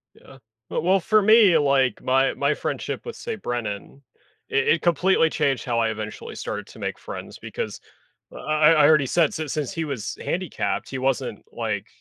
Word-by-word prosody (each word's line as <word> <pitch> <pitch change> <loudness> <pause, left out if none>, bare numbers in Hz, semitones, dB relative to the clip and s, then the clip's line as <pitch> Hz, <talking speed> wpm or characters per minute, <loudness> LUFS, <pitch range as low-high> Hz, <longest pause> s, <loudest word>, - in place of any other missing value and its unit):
Yeah. 135 - -16 0.3
Well - - -1
well, 190 +2 +4
for 215 +4 +3
me, 210 -5 +6
like, 135 -5 +2
my 135 +1 +2
my 140 +1 +1
friendship - - -4
with, 470 - -6
say, 230 - -5
Brennan, 120 - -5 0.5
it 135 0 +1
it 165 - +3
completely 175 0 +3
changed 140 -7 0
how 120 -3 0
I, 115 - +2
eventually, 110 -1 -6
started - - -5
to - - -14
make - - -4
friends - - -8
because - - -5 0.5
I - - -9
I 155 +1 +4
I 150 -3 +6
already 155 -3 +5
said 160 +3 +2
since 155 -3 -4
since 150 -5 -2
he 165 -1 -3
was 135 -8 -5
handicapped, 180 -2 -2
he 130 - -4
wasn't, 130 -1 -2
like, - - -3
145 Hz, 185 wpm, -24 LUFS, 130-170 Hz, 0.5 s, me